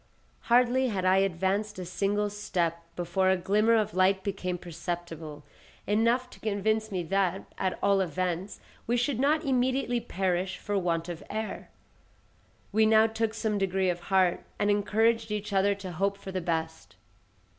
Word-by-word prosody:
Hardly 250 +2 +4
had 195 -5 -2
I 185 +1 +5
advanced 195 +3 0
a 185 - -5
single 205 +3 -1
step 175 -5 -1 0.2
before 180 +2 +1
a 190 - +3
glimmer 210 +5 +3
of 215 -6 +1
light 190 +1 +3
became 185 -3 -3
perceptible, 165 -3 -6 0.4
enough 230 +4 +2
to - - -14
convince 215 +1 0
me 185 -2 -2
that, 190 +2 0 0.2
at 185 -1 -1
all 200 -1 +4
events, 180 +2 -2 0.3
we 240 +2 +2
should 245 0 0
not 305 +4 +2
immediately 255 -1 +1
perish 190 -4 -1
for 205 - -3
want 170 -3 0
of 175 -1 -6
air. 220 0 -4 1.0
We 220 +1 +4
now 220 0 +6
took 225 0 -1
some 220 -2 -1
degree 190 -1 +1
of 175 - -5
heart, 190 -2 +3
and 205 0 +2
encouraged 220 +2 +2
each 210 0 -3
other 200 +1 +3
to 195 -2 -7
hope 195 +4 -1
for 195 -1 -8
the 185 -1 -2
best. 160 -1 -3
195 Hz, 160 wpm, -28 LUFS, 180-220 Hz, 1.0 s, now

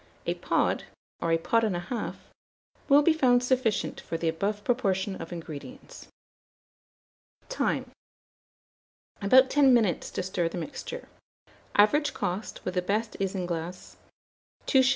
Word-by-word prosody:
A - - +1
pod, - - 0 0.4
or 165 - 0
a 165 - +4
pod 230 +7 +1
and 210 -5 +1
a - - -1
half, 225 +7 -4 0.7
will 285 +1 +7
be 330 - +5
found 250 -5 +3
sufficient 250 -4 0
for 165 - -4
the 165 - -2
above 200 +6 -1
proportion 200 -6 0
of 165 - -8
ingredients. 175 - -9 1.4
Time. - - -1 1.3
About 260 +6 +6
10 275 -3 +6
minutes 215 -8 +1
to - - -3
stir 180 -2 -1
the 175 - -6
mixture. 385 - -6 0.7
Average 290 +8 +4
cost, 185 +5 -4
with 185 - -2
the 180 - +1
best 215 +5 -1
isinglass, 180 -3 -4 0.7
2s. 260 -1 +4
205 Hz, 130 wpm, -28 LUFS, 180-260 Hz, 1.4 s, will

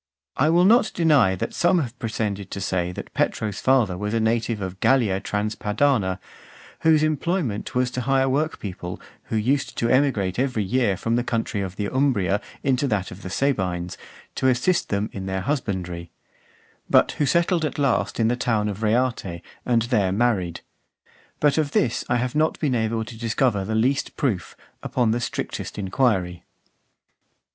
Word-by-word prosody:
I 150 +4 +3
will 175 +2 +4
not 225 +3 +5
deny 145 - +4
that - - -4
some 175 +1 +3
have 125 -7 -3
pretended 105 -4 -3
to - - -5
say, 90 -2 -1
that - - -8
Petro's 105 -2 -1
father 125 -8 +3
was 105 +4 -3
a - - +2
native 115 0 0
of 95 -1 -5
Gallia 110 -7 +3
Transpadana, 105 0 0 0.6
whose 155 -1 +4
employment 155 - -1
was 125 0 +1
to 125 - -3
hire 135 +1 +2
workpeople 120 - -3 0.3
who - - -4
used 130 +6 0
to 115 - +1
emigrate 120 -8 +2
every 125 -5 0
year 105 -2 +1
from 115 +4 0
the 120 - +1
country 115 -3 -2
of 95 -1 -5
the 105 - -2
Umbria 105 -8 +1 0.2
into 135 +1 +1
that 100 -6 -1
of 90 - -10
the 95 - -6
Sabines, 90 -8 -1 0.4
to 130 - 0
assist 130 +8 +2
them 100 +1 0
in 95 -1 -5
their 95 0 -2
husbandry; 90 - -3 0.8
but - - +5
who 145 - -1
settled 170 +1 +2
at 155 - -2
last 140 -5 0
in 110 - +3
the 120 - +2
town 110 -4 0
of 105 +1 -6
Reate, 110 -6 0 0.2
and 120 -2 +3
there 105 -6 +1
married. 100 -5 0 0.8
But 150 +1 +3
of 145 -2 -1
this 120 -1 +1
I 120 - +2
have 125 0 -1
not 155 +1 +1
been 145 -5 0
able 110 -1 0
to 115 - -9
discover 115 -2 0
the 110 +3 -2
least 130 +5 0
proof, 110 - -2 0.2
upon 120 -4 +1
the 120 - 0
strictest 120 - -4
inquiry. 95 -4 0
115 Hz, 170 wpm, -23 LUFS, 100-135 Hz, 0.8 s, not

